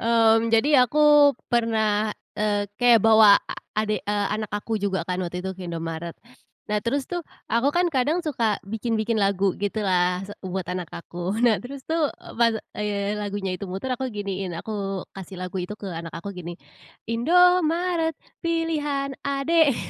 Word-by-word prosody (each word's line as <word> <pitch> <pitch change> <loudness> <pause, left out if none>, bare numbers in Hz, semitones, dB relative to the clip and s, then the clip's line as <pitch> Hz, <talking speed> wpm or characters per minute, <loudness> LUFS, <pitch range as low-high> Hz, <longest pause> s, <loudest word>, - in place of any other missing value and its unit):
Mmm, 230 0 +4
jadi 250 +2 +4
aku 295 -1 +6 0.2
pernah, 220 -2 +2 0.3
eee, 205 -1 +1 0.2
kayak 240 -2 +6
bawa 220 -2 +8
a - - -4 0.3
adek, 215 -1 -1
eee, 205 0 0
anak 215 0 -3
aku 210 +1 -2
juga, 190 -3 -1
kan, 180 +1 -2
waktu 180 0 -4
itu 190 - -2
ke 185 -1 -8
Indomaret. 165 0 -5 0.5
Nah, 210 0 -1
terus, 265 +3 -1
tuh, 350 -1 -4 0.2
aku, 235 +5 +2
kan, 350 +3 +2
kadang 280 +6 +2
suka 230 -8 0
bikin-bikin 225 +1 -1
lagu, 195 -1 +2
gitu, 205 +2 -1
lah, 180 0 +1
se 205 - -9
buat 185 -1 -4
anak 180 -2 -4
aku. 175 +4 -5
Nah, 225 -6 +3
terus, 265 +1 -9
tuh, 320 -2 +1
eee, - - -13
pas, 230 -1 +3 0.2
eee, 205 -1 -2
lagunya 205 -2 -3
itu 195 +1 -6
muter, 195 +8 -3
aku 260 0 -4
giniin, 195 -3 -4
aku 195 -2 -4
kasih 190 -1 -9
lagu 185 0 -4
itu 210 +4 -6
ke 200 - -7
anak 165 0 -6
aku 200 +4 -6
gini, 175 -1 -7 0.5
Indomaret 335 +5 +3 0.3
pilihan 305 -5 -1
adik, 280 0 +2
215 Hz, 165 wpm, -24 LUFS, 190-265 Hz, 0.5 s, bawa